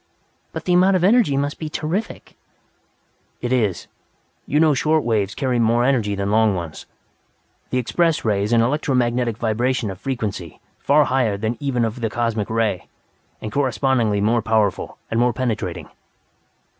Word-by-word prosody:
"But - - -7
the 180 - +2
amount 185 +2 +4
of 180 - +1
energy 200 - +4
must 145 +1 -2
be 155 - -4
terrific 165 +9 -4 0.6
" - - -43 0.3
"It 120 +1 -1
is. 105 -8 0 0.6
You 150 - +1
know 155 -1 +4
short 155 +3 +1
waves 105 -3 0
carry 130 -3 0
more 115 +1 +3
energy 115 -7 +1
than 100 0 -2
long 110 -2 +3
ones. 85 -3 -7 0.8
The 130 - -1
Express 160 +6 0
Ray 105 -3 +1
is 105 +3 -2
an 115 -1 +4
electromagnetic 125 -4 0
vibration 115 0 -1
of 95 - -10
frequency 105 - -4 0.2
far 150 +2 +4
higher 125 -7 0
than 110 +2 -1
that 120 - -7
of - - -33
even 130 -4 0
the 115 0 -2
Cosmic 115 -2 -2
Ray, 110 -4 -1 0.6
and 110 - -4
correspondingly 125 -5 +1
more 115 +3 +2
powerful 110 -3 0
and 115 - +1
more 120 0 +2
penetrating." 110 -8 -3
120 Hz, 165 wpm, -21 LUFS, 110-135 Hz, 0.8 s, amount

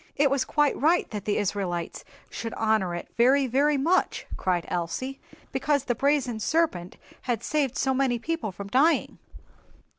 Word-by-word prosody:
"It 280 -1 +3
was 270 -2 +1
quite 295 +1 +2
right 330 +4 +3
that 210 -3 -5
the 210 - 0
Israelites 185 -4 -2 0.3
should 230 -1 -5
honor 215 -5 +1
it 175 - -6
very, 265 +4 +4
very 280 +4 +2
much," 335 +7 +1
cried 180 -3 -1
Elsie, 175 +11 -3 0.3
"because 280 +1 0
the 250 - 0
brazen 265 -2 0
serpent 215 - 0 0.3
had 235 -2 0
saved 290 -5 0
so 265 - +1
many 260 -2 +1
people 310 -3 -3
from 200 +2 -8
dying." 275 +10 +2
255 Hz, 155 wpm, -26 LUFS, 205-285 Hz, 0.3 s, very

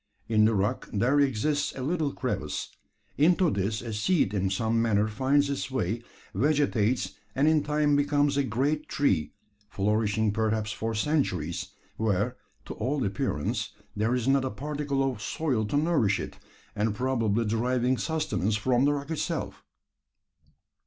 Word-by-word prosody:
In 110 -1 +4
the 110 0 +3
rock 100 +1 -1
there 125 +8 +2
exists 140 +2 +1
a 130 - -5
little 155 0 0
crevice. - - -3 0.5
Into 170 +2 +4
this 105 +2 -1
a 115 -2 -5
seed 105 - +1
in 95 -2 0
some 115 +4 +1
manner 105 -2 +2
finds 135 +6 +2
its 140 -1 -3
way, 115 -3 -1 0.3
vegetates, 130 -2 +1 0.2
and 140 +3 +3
in 155 -1 +4
time 150 -1 +2
becomes 145 0 +2
a 140 - +3
great 135 +6 -1
tree 120 - +1 0.3
flourishing 105 +1 +1
perhaps 110 -1 0
for 115 +1 -3
centuries, 105 - -1 0.3
where, 110 +3 0 0.3
to - - -6
all 130 +4 -1
appearance, 100 0 -2 0.2
there 110 +4 +1
is 125 -1 -1
not 135 0 +3
a 130 - -1
particle 145 0 -2
of 130 -6 -2
soil 125 0 -1
to 105 +7 -1
nourish 145 -11 +2
it, - - -7 0.4
and 105 0 0
probably 115 -3 0
deriving 125 +3 +1
sustenance 110 - 0
from 125 +4 +2
the 145 - +3
rock 140 +2 -4
itself! 160 - -3
125 Hz, 150 wpm, -27 LUFS, 105-145 Hz, 0.5 s, In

